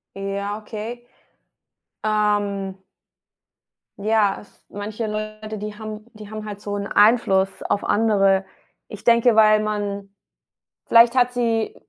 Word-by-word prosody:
Ja, 200 +1 -4
okay, 220 +3 -7 1.0
ähm 205 -2 0 1.2
ja, 210 -1 +1
s - - -25
manche 215 +2 -5
Leute, 215 0 -5
die 210 +1 -6
haben 215 -1 -8
die 215 -2 -11
haben 215 0 -7
halt 205 -1 -7
so 205 0 -5
'n 200 0 -3
Einfluss 200 -4 +3
auf 205 - -1
andere. 195 -3 +2 0.4
Ich 210 - -10
denke, 235 0 +4
weil 215 -1 +5
man 205 -2 -3 0.8
vielleicht 235 +2 +6
hat 250 -1 +3
sie 230 -2 -1
210 Hz, 120 wpm, -22 LUFS, 200-220 Hz, 1.2 s, vielleicht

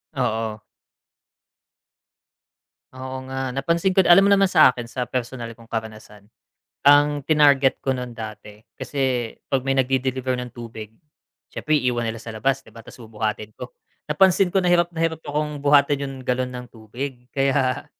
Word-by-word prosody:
Oo. 110 -1 -2 2.3
Oo 130 0 -7
nga, 130 -1 -3
napansin 170 +7 0
ko 190 - +5
alam 185 +2 +6
mo 200 - +5
naman 195 -1 +4
sa 130 - +6
akin 120 -1 -7
sa 125 -1 -3
personal 120 -1 -5
kong 115 0 -18
karanasan, 110 -2 -7 0.6
ang 145 +1 +5
tinarget 140 -2 +4
ko 135 - -1
nun 125 -2 -6
dati 110 -1 -9
kasi 130 -4 -2 0.2
'pag 135 -2 0
may 135 +1 -1
nag-de-deliver 130 0 0
ng 125 - -7
tubig, 115 -3 -9 0.6
siyempre 155 0 +1
iiwan 125 -3 0
nila 115 - -5
sa 115 0 -9
labas 135 +5 -1
'di - - -18
ba 115 - -11
ta's - - -14
bubuhatin 110 -2 -5
ko. - - -9 0.4
Napansin 190 -1 +4
ko 195 - -1
na 180 -2 +3
hirap 175 0 +3
na 165 -1 -1
hirap 160 -1 -4
akong 150 -1 -3
buhatin 145 0 +3
yung 135 -1 -5
galon 125 0 -1
ng 125 0 -7
tubig 125 +2 -8
kaya 135 -1 0
130 Hz, 160 wpm, -22 LUFS, 115-145 Hz, 2.3 s, alam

